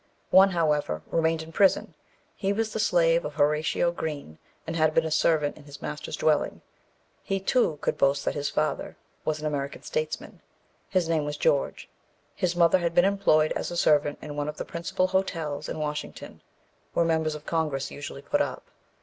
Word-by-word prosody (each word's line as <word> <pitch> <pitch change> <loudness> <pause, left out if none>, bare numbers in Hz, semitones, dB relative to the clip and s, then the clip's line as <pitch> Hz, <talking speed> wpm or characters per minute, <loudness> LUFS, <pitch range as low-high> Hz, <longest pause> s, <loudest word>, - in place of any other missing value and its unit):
One, 190 +1 +8
however, 150 - 0
remained 160 -1 +1
in 160 - -11
prison. 195 +3 +3 0.4
He 195 -1 -1
was 220 +1 -1
the - - -2
slave 170 -5 +3
of 150 - -6
Horatio 150 +3 +2
Green, 150 - -6 0.3
and 165 - -4
had 155 -1 +2
been 165 - +3
a 160 - -3
servant 155 -2 +2
in 150 - -15
his 145 -1 -11
master's 150 - -5
dwelling. 155 -2 +1 0.6
He, 195 0 -2
too, 190 - +1
could - - -1
boast 140 +1 +2
that - - 0
his 145 -1 -2
father 155 0 -2 0.3
was 155 -1 -1
an 155 - -6
American 140 -2 -3
statesman. 480 -1 -4 0.5
His 185 -3 +1
name 160 -2 +1
was 145 0 -4
George. 135 - 0 0.5
His 180 -1 0
mother 175 +1 +5
had 170 -1 -1
been 175 - +6
employed 195 -6 +3
as - - -2
a 175 - -4
servant 150 -3 +3
in 150 -1 -6
one 145 0 -2
of 150 - -7
the - - -4
principal 170 +2 -1
hotels 165 -6 -2
in - - -4
Washington, 150 -1 -5 0.5
where 170 - +2
members 160 -1 +1
of 150 0 -10
Congress 150 -5 -1
usually 140 -1 -8
put 290 - +1
up. - - -2
155 Hz, 185 wpm, -27 LUFS, 150-175 Hz, 0.6 s, One